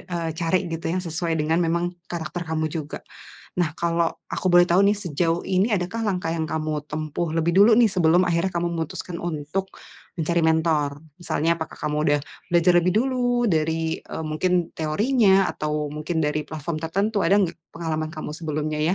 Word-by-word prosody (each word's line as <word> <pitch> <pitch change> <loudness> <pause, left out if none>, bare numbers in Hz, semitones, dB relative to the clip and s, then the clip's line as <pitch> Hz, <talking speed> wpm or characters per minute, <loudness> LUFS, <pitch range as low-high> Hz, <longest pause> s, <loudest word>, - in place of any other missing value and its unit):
eee, 170 -1 -1
cari 170 +2 +2
gitu 165 0 -5
yang 185 +1 -1
sesuai 165 +1 -2
memang 160 +2 +1
dengan 170 +1 +1 0.2
karakter 175 +1 -4
kamu 160 0 -1
juga. 150 -2 -5 0.6
Nah, 170 -3 +2
kalau 170 0 +2 0.3
aku - - -3
boleh 175 0 +7
tahu 175 +2 +5
nih, 205 - +3
sejauh 165 +1 0
ini 190 +3 +1
adakah 180 +5 -3
langkah 180 -4 -1
yang 160 -1 -1
kamu 155 0 -1 0.2
tempuh 155 +2 -2
lebih 165 +1 +2
dulu 205 +3 +8
nih 235 - +6
sebelum 175 -2 +4
akhirnya 170 +2 +1
kamu 170 0 0
memutuskan 170 +1 -4
untuk 170 +3 -3 0.5
mencari 170 +1 +1
mentor? 160 -2 +2 0.3
Misalnya 165 -2 0
apakah 160 - -6
kamu 150 0 -1
sudah 145 0 +3 0.3
belajar 175 +1 +4
lebih 175 +1 +2
dulu 245 -1 +1
dari, 160 0 0
eee, - - -7
mungkin 175 +2 +1
teorinya 195 +5 +3
atau 150 -1 -2
mungkin 155 +3 -3
dari 150 0 -1
platform 155 +1 -4
tertentu, 195 +7 0
ada 185 - +4
enggak 180 -4 -1 0.2
pengalaman 155 -2 -3
kamu 155 -1 -5
sebelumnya 155 -2 -3
ya? 160 +4 +2
165 Hz, 175 wpm, -24 LUFS, 155-180 Hz, 0.6 s, dulu